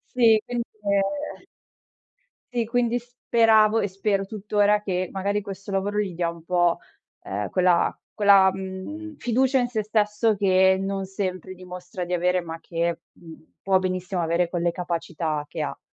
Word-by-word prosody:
Sì, 225 -3 +5
quind 240 -1 -3 0.2
ehm 200 +9 -1 1.1
Sì, 235 -2 0
quindi 240 +1 +1
speravo 225 -2 +3
e - - +1
spero 195 0 -1
tuttora 210 0 +1
che, 185 -2 -2
magari, 200 +2 -1
questo 195 0 -8
lavoro 200 +2 0
gli 195 -4 -3
dia 170 -1 0
un 170 -1 -12
po', 175 -1 +2 0.4
ehm, 100 +1 -3
quella 180 -2 +2 0.2
quella, 200 -2 +6
mhmm, 195 +13 -7
fiducia 260 +2 +2
in 245 - 0
se 220 -3 -1
stesso 215 +1 +1
che 190 -1 +4
non 195 0 -3
sempre 185 -1 -4
dimostra 180 0 -7
di 180 - -6
avere, 180 +1 +2
ma 165 -1 -7
che, 170 0 -2
mhmm, 160 -1 -15
può 190 -1 +3
benissimo 185 0 -2
avere 170 +1 +1
quelle 175 -1 0
capacità 165 -3 -3
che - - -4
ha. - - -4
195 Hz, 155 wpm, -24 LUFS, 180-215 Hz, 1.1 s, quella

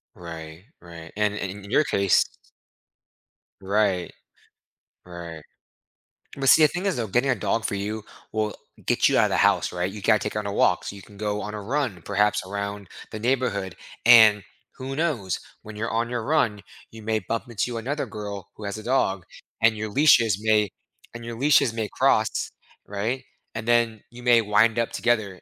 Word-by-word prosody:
Right, 80 0 -9 0.2
right, 85 -2 -11
and 105 -1 +1
and 100 -1 -4
a 100 - -12
in 100 - -11
your 150 - +4
case 100 - +3 1.4
Right. 95 -2 0 0.9
Right. 85 -2 -8 1.0
But 135 -1 +2
see, 160 - +7
the - - +8
thing 175 +6 -5
is, 195 - 0
though, 115 -2 -2
getting 120 +7 +1
a 125 - +3
dog 110 +1 -1
for - - -1
you 105 +2 -4 0.3
will 110 -1 -1 0.3
get - - +3
you - - +2
out - - +5
of - - 0
the - - 0
house, - - +3
right? 90 +1 -2
You 105 +1 -9
gotta 110 +2 +4
take 105 - -4
her - - -1
on 105 - -6
her 100 - -2
walks, 90 -2 +1
you 100 -1 -11
can 100 0 -16
go 105 0 -2
on 105 - -6
a 105 - -5
run 120 - -2
perhaps 105 +1 +1
around 100 0 -5 0.2
the 110 - -6
neighborhood, 110 -7 -1 0.3
and 110 -4 +8 0.3
who 135 +1 -5
knows? 135 - -1 0.2
When 105 0 -10
you're 115 +2 -3
on 115 +1 -1
your 120 -2 -3
run, 115 -7 +1 0.3
you 110 - -11
may 110 0 0
bump 115 +4 -3
into 120 +1 -2
another 140 +6 -3
girl 105 -3 -7
who 110 - -11
has 100 +1 -4
a 110 - -8
dog, 100 -8 0 0.4
and 115 -1 +5
your 110 0 -4
leashes 115 - +4
may 110 -2 +3 0.4
and 120 -1 -8
your 115 -1 -6
leashes 140 -3 +4
may 110 -2 -3
cross, - - +1 0.3
right? 110 +6 -3 0.3
And 115 0 -5
then 115 -2 +2
you 120 +1 -11
may 120 -1 +5
wind 110 +2 +3
up 115 -1 0
together, 110 -6 -1
110 Hz, 190 wpm, -24 LUFS, 100-120 Hz, 1.4 s, the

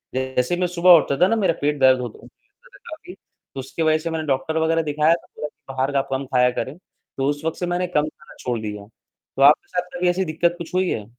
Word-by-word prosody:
जैसे 130 +3 0
ही - - -6
मैं 180 - +2
सुबह 180 +1 +4
उठता 140 -3 0
था - - +6
ना 225 - +1
मेरा 195 -6 +2
पेट 145 0 0
दर्द 130 -1 +5
होता 120 -3 -7
था - - -15
मेरा - - -22
काफ़ी, - - -10
तो 135 - -15
उसकी 135 +5 -6
वजह 155 -1 +3
से 165 +1 -5
मैंने 160 -1 -3
डॉक्टर 150 +4 -1
वगैरह 165 +1 +2
दिखाया, 150 +2 +2
तो 170 - -5
बोला 150 - -2 0.3
बाहर 130 +2 0
का 140 -1 +2
कम 135 +1 -2
खाया 125 0 +4
करें। 135 +5 -5 0.4
तो 135 +1 0
उस 145 +1 -3
वक़्त 160 - -2
से 175 - -1
मैंने 180 +1 -1
कम 150 -3 0
खाना 150 0 -14
छोड़ 120 -2 -2
दिया, 105 -1 -6
तो 115 - -12
आपके 145 +2 +6
साथ 180 0 -3
कभी 180 0 +1
ऐसी 185 +2 0
दिक्कत 170 +2 0
कुछ 170 +1 -8
हुई 185 0 +1
है? 105 -2 -3
155 Hz, 250 wpm, -22 LUFS, 135-175 Hz, 0.4 s, था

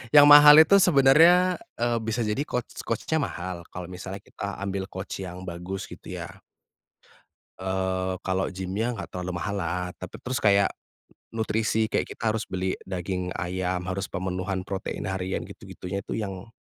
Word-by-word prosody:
Yang 145 0 +10
mahal 145 0 +11
itu 200 +5 +6
sebenarnya, 170 +4 +6 0.2
eee, 120 0 +1
bisa 110 +2 -1
jadi 105 +6 -1
coach 125 -1 -3 0.2
coach-nya 135 +7 -1
mahal 90 -6 -5
kalau 90 -1 -6
misalnya 95 +2 -7
kita 100 -1 -7
ambil 95 -1 -2
coach 95 +1 -6
yang 90 0 -8
bagus, 90 +3 -5
gitu, - - -10
ya. - - -6 1.3
Eee, 95 0 -1
kalau 95 0 0
gimnya 95 +6 -2
enggak - - -7
terlalu 90 0 -4
mahal 105 -1 -2
lah, 90 0 -2
tapi 95 - -8
terus 130 0 -2
kayak 100 -2 +5 0.7
nutrisi, 110 0 0
kayak - - 0
kita 115 - -1
harus 110 -1 -2
beli 95 0 -1
daging 90 0 -3
ayam, 90 -1 -2
harus 95 0 -2
pemenuhan 95 +1 -3
protein 95 -1 -4
harian, 95 0 -2
gitu-gitunya 90 +2 -7
itu - - -5
yang 95 -2 -5
95 Hz, 155 wpm, -26 LUFS, 95-110 Hz, 1.3 s, mahal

